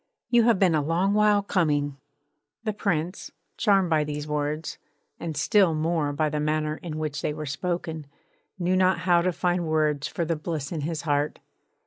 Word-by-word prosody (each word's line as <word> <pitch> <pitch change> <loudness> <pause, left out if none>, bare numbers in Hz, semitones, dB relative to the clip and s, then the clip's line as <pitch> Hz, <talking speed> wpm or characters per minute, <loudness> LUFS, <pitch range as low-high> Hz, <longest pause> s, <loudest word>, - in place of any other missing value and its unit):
'You 235 -2 +5
have 235 -4 +4
been 185 -3 +3
a 155 - +2
long 170 +7 +1
while 210 -1 +4
coming!' 145 -7 0 0.7
The 215 -1 -1
Prince, 175 -2 -2 0.3
charmed 195 -5 +3
by 155 -1 +3
these 150 0 -4
words, 150 +1 -3 0.4
and 160 -3 -4
still 185 +1 +3
more 155 -1 0
by 155 +2 0
the 150 0 -2
manner 155 0 0
in 160 -3 -6
which 150 -2 -3
they 150 - -2
were 155 0 -5
spoken, 160 0 -3 0.5
knew 180 0 +1
not 185 0 +3
how 175 -1 +4
to 185 +1 +1
find 175 -1 0
words 155 -2 +1
for 170 - -3
the 165 +1 0
bliss 155 -2 -4
in 160 -3 -3
his 160 +2 -3
heart. 145 -1 0
160 Hz, 180 wpm, -26 LUFS, 150-180 Hz, 0.7 s, You